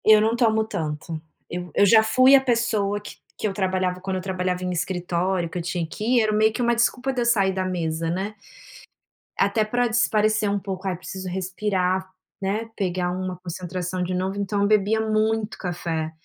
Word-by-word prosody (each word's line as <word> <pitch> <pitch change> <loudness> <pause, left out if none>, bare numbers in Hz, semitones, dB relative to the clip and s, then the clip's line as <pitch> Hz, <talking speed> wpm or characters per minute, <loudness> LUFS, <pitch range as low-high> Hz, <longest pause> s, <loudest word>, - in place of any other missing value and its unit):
Eu 215 0 +7
não 220 +2 +2
tomo 220 -2 +3
tanto. 155 -5 -4 0.3
Eu 175 -1 -5
eu 205 - +5
já 220 +3 +7
fui 255 +5 +6
a 270 - +6
pessoa, 225 -5 +1
que 205 - -11 0.2
que - - -1
eu 200 - -3
trabalhava 185 -1 0
quando 190 0 -3
eu - - -3
trabalhava 185 -1 -2
em 180 - -1
escritório, 175 0 -1
que 180 - -6
eu 175 - -3
tinha 170 0 -2
que 210 - -7 0.2
ir, - - +4
era 215 -1 +1
meio 215 +1 +3
que 245 - -3
uma 235 0 +2
desculpa 250 +3 +1
de 255 -2 -2
eu - - 0
sair 200 -5 +3
da 190 0 -2
mesa, 165 -3 -2
né. 190 +5 -2 1.0
Até 220 - +3
para 245 +3 +1
espairecer 215 -2 +2
um 200 0 0
pouco, 195 -1 -5
"ai, 185 - 0
preciso 185 +2 -7
respirar, 185 0 -1 0.3
né, 210 +4 -2
pegar 180 -2 -1
uma 185 0 -4
concentração 180 +1 -4
de 180 +1 -2
novo", 190 +2 -2
então 200 0 -1
eu 200 - +3
bebia 215 +1 +3
muito 220 0 0
café, 165 -3 -3
190 Hz, 200 wpm, -24 LUFS, 180-215 Hz, 1.0 s, Eu